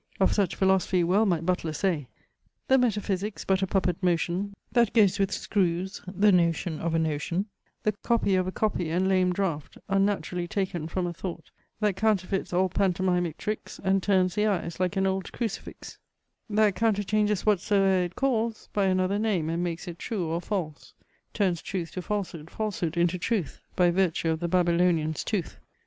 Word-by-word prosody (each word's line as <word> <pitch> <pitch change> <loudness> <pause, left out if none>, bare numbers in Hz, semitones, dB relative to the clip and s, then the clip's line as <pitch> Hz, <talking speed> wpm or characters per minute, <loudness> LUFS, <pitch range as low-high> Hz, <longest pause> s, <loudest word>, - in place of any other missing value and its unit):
Of 190 - +3
such 200 -5 +1
philosophy 190 -2 +2
well 195 +6 +3
might 170 -3 0
Butler 175 -3 0
say 155 -4 -1 0.6
The 265 0 +6
metaphysic's 210 -3 -1
but 190 0 +2
a 190 - +1
puppet 185 -2 0
motion 180 +3 0 0.2
That 235 -3 +3
goes 210 -4 +4
with 195 -1 +1
screws, 185 -1 -1
the 200 +3 +3
notion 170 -2 +1
of 165 0 -1
a - - +3
notion; 160 +4 -1 0.4
The 215 - +2
copy 230 -4 +1
of 185 -1 +2
a - - -2
copy 185 -5 -1
and 180 +4 +1
lame 185 -1 +3
draught 175 -6 -2
Unnaturally 195 -3 0
taken 180 -4 -2
from 180 +2 -2
a 175 - -3
thought 170 -1 -7 0.3
That 205 -3 +1
counterfeits 195 -3 0
all 185 +1 +2
pantomimic 180 -3 0
tricks, 215 0 -5
And 190 0 +2
turns 185 -2 +2
the 210 +1 +1
eyes, 180 -5 -2
like 185 +1 0
an 190 - +2
old 190 -1 -1
crucifix; 230 -4 -5 0.5
That 210 -1 +3
counterchanges 210 -1 +1
whatsoe'er 195 -2 +3
it 175 - -8
calls 235 -4 -1
By 200 -1 +2
another 185 +1 +1
name, 190 -8 0
and 170 +1 -1
makes 175 +1 -4
it 170 -1 -7
true 205 -7 -3
or 165 +2 -2
false; 170 -6 -4 0.4
Turns 185 -6 0
truth 175 -4 -4
to 185 - -5
falsehood, 180 -6 -4
falsehood 185 -6 -3
into 175 +1 +2
truth, 190 - -2
By 175 -1 +4
virtue 175 -2 +1
of 160 - -1
the 170 - -2
Babylonian's 170 -3 +2
tooth. 200 -6 -3
185 Hz, 175 wpm, -27 LUFS, 175-200 Hz, 0.6 s, The